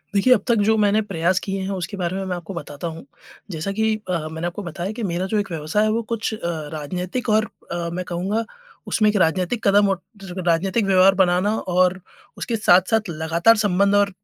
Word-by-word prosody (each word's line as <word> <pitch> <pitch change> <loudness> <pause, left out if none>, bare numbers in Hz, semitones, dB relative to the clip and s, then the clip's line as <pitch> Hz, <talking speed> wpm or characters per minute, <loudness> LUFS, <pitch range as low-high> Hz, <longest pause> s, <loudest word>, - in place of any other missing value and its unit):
देखिए, 250 +6 +5
अब 205 - +1
तक 235 - +4
जो 220 - +4
मैंने 210 +1 +3
प्रयास 185 -2 0
किए 195 -1 -3
हैं 190 - -3
उसके 195 +1 -4
बारे 180 0 -2
में 195 - -3
मैं 185 -1 -2
आपको 175 +2 -7
बताता 150 0 -6
हूँ, 165 0 -8 0.5
जैसा 160 +4 -3
कि 220 +1 +1
अ, 165 -3 -1
मैंने 160 +2 -3
आपको 180 +4 -6
बताया 175 +2 -4
कि - - -3
मेरा 180 -1 -1
जो 210 - +3
एक 195 -3 -4
व्यवसाय 160 +6 0
है 215 - +2
वो 230 +2 0
कुछ 225 -1 -2
अ, 215 - -6 0.3
राजनीतिक 180 - -4
और 215 +1 +3 0.2
अ, 170 -1 -2
मैं 180 0 -4
कहूँगा 195 +6 -2 0.4
उसमें 215 -1 +2
एक 210 - -1
राजनीतिक 185 +6 +1
कदम 200 0 +5
और 190 -1 -1 0.2
टर 185 -1 -6
राजनैतिक 190 +6 +1
व्यवहार 190 0 +5
बनाना 190 +3 +2
और 185 +1 +1 0.4
उसके 235 - -2
साथ-साथ 205 +1 +3
लगातार 165 +7 +3
संबंध 200 -1 +2
और 200 0 +4
190 Hz, 210 wpm, -22 LUFS, 175-210 Hz, 0.5 s, देखिए